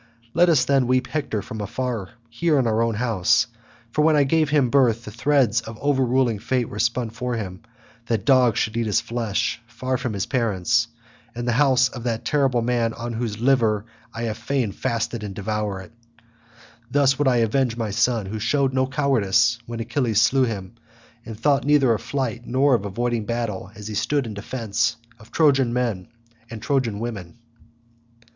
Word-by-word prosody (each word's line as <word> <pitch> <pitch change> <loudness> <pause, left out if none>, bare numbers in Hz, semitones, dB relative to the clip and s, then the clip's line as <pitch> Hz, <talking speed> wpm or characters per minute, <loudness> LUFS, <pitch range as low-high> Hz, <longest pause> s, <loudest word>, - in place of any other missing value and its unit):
Let 175 0 +4
us 145 -6 +4
then 135 -3 +2
weep 130 0 +2
Hector 130 -8 -3
from 115 -4 -7
afar 115 -1 -3 0.2
here 150 +7 +1
in 130 - +2
our 110 0 +1
own 115 -1 0
house, 110 -4 +2 0.5
for 150 - +1
when 155 0 +4
I 145 - +5
gave 155 +2 +2
him 140 -5 +2
birth 120 -4 +3
the 105 - -7
threads 125 -1 +2
of 110 0 -9
overruling 130 -5 +1
fate 125 +2 -1
were 105 - -7
spun 120 0 0
for 125 +1 -3
him 95 -5 -5 0.5
that 115 -3 -1
dogs 130 -5 +4
should 110 - -1
eat 115 -1 0
his 105 - +2
flesh 115 -2 -2
far 130 +2 -3
from 125 -3 -3
his 100 -1 -2
parents, 115 -2 +1 0.5
in 120 0 -4
the 120 - +1
house 130 0 +4
of 125 -1 -8
that 115 -2 -2
terrible 135 -5 +1
man 115 -1 0
on 120 +1 -5
whose 110 -2 -3
liver 115 -5 +2 0.3
I 115 - -5
would 110 -2 -2
fain 120 -2 -1
fasten 115 +1 -3
and 100 -2 -6
devour 105 -1 -3
it. 95 - -13 1.0
Thus 140 -1 +2
would 145 - +2
I 130 - +4
avenge 120 +1 0
my 110 -3 -2
son, 115 +1 +1
who 110 +3 -5
showed 135 +4 +1
no 130 0 +1
cowardice 125 -5 +2
when 115 0 -5
Achilles 120 -2 0
slew 130 +4 +4
him, 105 -3 -5 0.5
and 110 -2 -8
thought 140 +1 +2
neither 140 -4 +4
of 110 - -3
flight 120 -4 -3
nor 135 +2 +3
of 115 -5 +1
avoiding 115 +2 -2
battle 115 -5 -3
as 105 -1 -8
he 110 - -5
stood 140 +6 0
in 110 - -6
defence 115 +1 -2 0.2
of 110 +1 -17
Trojan 135 -6 +3
men 115 -7 -1 0.4
and 115 -2 -7
Trojan 115 -3 -1
women." 110 -6 -6
120 Hz, 185 wpm, -23 LUFS, 110-130 Hz, 1.0 s, I